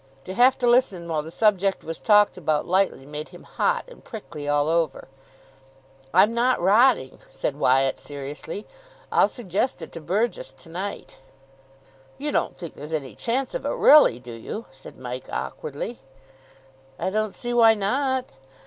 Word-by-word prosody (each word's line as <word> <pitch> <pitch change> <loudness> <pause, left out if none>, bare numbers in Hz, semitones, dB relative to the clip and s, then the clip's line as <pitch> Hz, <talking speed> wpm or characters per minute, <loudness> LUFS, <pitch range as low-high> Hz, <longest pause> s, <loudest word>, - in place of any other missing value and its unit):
To 185 - -6
have 250 +5 +5
to 250 - -1
listen 220 -8 +2
while 160 -2 -1
the 155 - -9
subject 195 0 +1
was 165 0 -6
talked 210 -1 +5
about 155 -4 0
lightly 185 -6 +1
made 150 +1 -6
him - - -14
hot 485 0 -1
and - - -15
prickly 175 - -8
all 145 0 +2
over. 160 -5 0 1.0
"I'm 205 +6 +5
not 245 +2 +2
rotting," 210 - +3
said 140 - -3
Wyatt 135 -1 +2
seriously, 145 +7 -7 0.5
"I'll - - +5
suggest 220 +1 -2
it 160 - -9
to 165 - -8
Burgess 205 +7 -1
to 165 - -15
night." 185 +5 -6 1.0
"You 295 +1 -3
don't - - -1
think 170 -3 -8
there's 150 +3 -9
any 135 -7 -3
chance 250 - -2
of - - -4
it, - - -1
really, 295 - +7
do 125 -1 -10
you?" 160 - -7
said 135 0 -13
Mike 125 0 -7
awkwardly. 155 - -5 1.0
"I 190 - -2
don't 215 0 0
see 240 +4 -4
why 225 -2 +6
not? 260 +6 0
185 Hz, 160 wpm, -24 LUFS, 150-235 Hz, 1.0 s, really